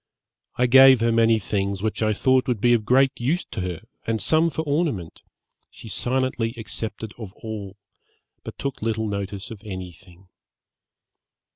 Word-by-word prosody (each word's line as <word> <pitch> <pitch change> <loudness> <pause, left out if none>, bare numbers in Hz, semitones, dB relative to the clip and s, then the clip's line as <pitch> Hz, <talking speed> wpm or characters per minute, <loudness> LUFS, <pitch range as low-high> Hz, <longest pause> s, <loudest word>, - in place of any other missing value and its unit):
I 125 - +2
gave 130 0 +8
her 115 0 +3
many 115 0 +4
things 100 -1 -2
which 110 0 -2
I 110 -1 +2
thought 130 +4 +2
would 125 -4 0
be 120 +3 +4
of 110 -3 +1
great 130 +3 +4
use 145 +9 -1
to 105 - -4
her, 90 -2 -4 0.3
and 115 -1 0
some 160 - +2
for 160 +1 -3
ornament; 145 - -2 0.5
she - - -13
silently 120 0 -1
accepted 110 -1 -5
of 105 -5 -7
all, 105 -3 -7 0.7
but - - -9
took 140 -1 -4
little 110 0 -1
notice 100 0 -5
of 110 -3 -9
any 95 -4 -6
thing. 90 +1 -19
110 Hz, 160 wpm, -23 LUFS, 100-130 Hz, 0.7 s, gave